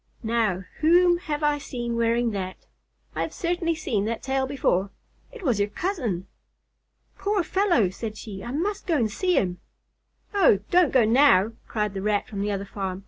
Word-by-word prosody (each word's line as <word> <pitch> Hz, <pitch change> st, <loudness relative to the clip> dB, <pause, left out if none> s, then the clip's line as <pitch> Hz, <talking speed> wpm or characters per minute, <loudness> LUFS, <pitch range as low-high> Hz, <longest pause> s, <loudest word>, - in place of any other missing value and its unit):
"Now, 220 Hz, -5 st, 0 dB, 0.2 s
whom 345 Hz, +2 st, +5 dB
have 300 Hz, -4 st, -4 dB
I 295 Hz, 0 st, +2 dB
seen 240 Hz, -4 st, -4 dB
wearing 235 Hz, 0 st, +1 dB
that? 185 Hz, -2 st, -5 dB, 0.5 s
I -, -, -3 dB
have -, -, -3 dB
certainly 340 Hz, -1 st, -1 dB
seen 235 Hz, -10 st, -1 dB
that 230 Hz, +1 st, -3 dB
tail 265 Hz, 0 st, 0 dB
before 200 Hz, -8 st, 0 dB, 0.4 s
it 480 Hz, -5 st, -11 dB
was 245 Hz, -, +1 dB
your 205 Hz, +1 st, +1 dB
cousin!" 235 Hz, -, -2 dB, 0.9 s
"Poor 405 Hz, -2 st, +1 dB
fellow!" 345 Hz, -, +2 dB
said 215 Hz, +2 st, -6 dB
she. 200 Hz, -4 st, -8 dB
"I 235 Hz, -, -6 dB
must 390 Hz, +11 st, -2 dB
go 330 Hz, -3 st, +2 dB
to 235 Hz, -5 st, +2 dB
see 360 Hz, -, 0 dB
him." 180 Hz, -2 st, 0 dB, 0.7 s
"Oh, 385 Hz, -, +5 dB
don't 355 Hz, -3 st, +4 dB
go 255 Hz, -4 st, +4 dB
now," 225 Hz, -4 st, +5 dB, 0.2 s
cried 210 Hz, -2 st, -2 dB
the 195 Hz, -, -4 dB
Rat 205 Hz, 0 st, 0 dB
from 200 Hz, -2 st, -5 dB
the 205 Hz, +1 st, -1 dB
other 200 Hz, 0 st, -3 dB
farm. 190 Hz, -2 st, -4 dB
235 Hz, 180 wpm, -25 LUFS, 205-330 Hz, 0.9 s, whom